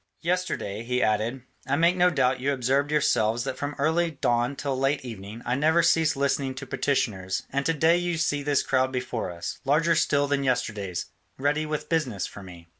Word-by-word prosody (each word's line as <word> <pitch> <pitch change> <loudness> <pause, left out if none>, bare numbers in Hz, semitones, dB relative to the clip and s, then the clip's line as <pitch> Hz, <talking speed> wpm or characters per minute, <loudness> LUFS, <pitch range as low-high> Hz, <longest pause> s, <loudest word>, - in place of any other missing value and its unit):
Yesterday," 170 - -2
he 125 +1 0
added, 110 +4 0 0.2
"I 135 - +2
make 170 +4 +3
no 180 0 +4
doubt 130 -5 +1
you 135 +3 0
observed 135 +2 +1
yourselves 120 -6 +2
that - - -3
from 145 +2 -4
early 160 +4 +2
dawn 120 -3 0
till 140 -1 -2
late 135 +1 0
evening 110 0 -8
I - - 0
never 160 +5 +3
ceased 160 -3 +3
listening 140 -1 0
to 135 +1 -7
petitioners, 105 -9 -1
and 140 +1 -1
to 165 - +2
day 160 +3 +4
you 175 -1 -1
see 150 -3 0
this 145 -1 +1
crowd 130 0 +1
before 125 -4 -3
us, 85 -1 -6
larger 155 +5 +3
still 145 -3 +2
than 140 -1 0
yesterday's, 105 -8 -2 0.3
ready 150 +3 0
with 150 -1 -3
business 130 - -1
for 100 - -9
me. 90 -3 -12
135 Hz, 190 wpm, -26 LUFS, 120-150 Hz, 0.3 s, no